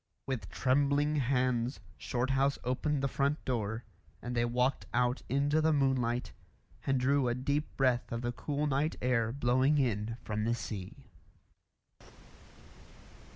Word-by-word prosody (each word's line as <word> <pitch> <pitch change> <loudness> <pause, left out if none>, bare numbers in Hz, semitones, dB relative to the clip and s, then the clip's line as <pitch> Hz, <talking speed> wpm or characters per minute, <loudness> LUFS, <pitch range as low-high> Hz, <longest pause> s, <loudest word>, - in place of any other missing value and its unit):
With 120 -9 -3
trembling 140 +3 +2
hands 125 -2 +1 0.2
Shorthouse 135 +3 +1
opened 135 +3 0
the - - +3
front 140 +2 -1
door, 110 -2 -2 0.4
and 125 0 -5
they 120 0 +2
walked 125 +2 0
out 125 +1 +2
into 145 +4 +2
the 160 0 +3
moonlight 130 -4 +1 0.6
and 135 -1 +2
drew 135 +1 +2
a 120 - +1
deep 140 +4 -2
breath 125 -3 +2
of 115 +1 -3
the 120 - 0
cool 145 +4 -2
night 145 +2 0
air 115 -3 +1
blowing 130 +3 +2
in 115 -4 0
from 105 0 -2
the 115 +2 +1
sea. 110 +4 -7
130 Hz, 135 wpm, -32 LUFS, 120-140 Hz, 0.6 s, the